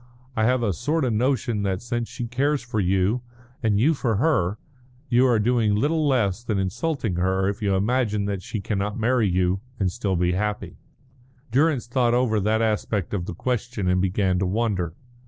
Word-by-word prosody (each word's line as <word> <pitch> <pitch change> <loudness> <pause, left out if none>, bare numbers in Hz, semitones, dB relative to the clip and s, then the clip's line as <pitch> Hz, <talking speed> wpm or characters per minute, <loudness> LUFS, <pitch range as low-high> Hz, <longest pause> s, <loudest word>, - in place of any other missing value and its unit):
I 110 - +2
have 125 0 +2
a 105 -4 +1
sort 150 - 0
of 120 - 0
notion 120 -2 0
that 95 -2 -1
since 120 0 -3
she 120 - -5
cares 135 +4 0
for 120 -3 -3
you 95 +5 +1 0.4
and 105 -3 +2
you 150 +8 +4
for 120 -6 -1
her, 105 - +1 0.5
you 125 +2 +4
are 120 -3 +3
doing 110 -1 +2
little 150 +7 +1
less 115 -6 +1
than 110 -4 -1
insulting 110 - -1
her 95 +1 +1
if 100 +3 -3
you 100 -2 +1
imagine 105 0 +1
that 100 -2 -2
she 105 +2 -5
cannot 105 +1 -2
marry 115 -2 +2
you 90 +1 +1 0.2
and 95 -3 +1
still 100 -2 -2
be 90 0 +1
happy." 105 +3 -3 0.7
Durrance 140 0 +2
thought 120 -1 +1
over 120 -4 +2
that 110 +3 +1
aspect 105 -3 -1
of 90 -4 -2
the - - -5
question, 120 -3 -2
and 90 0 +2
began 95 -1 +1
to 95 - 0
wonder. 95 -5 -1
110 Hz, 190 wpm, -24 LUFS, 95-125 Hz, 0.7 s, you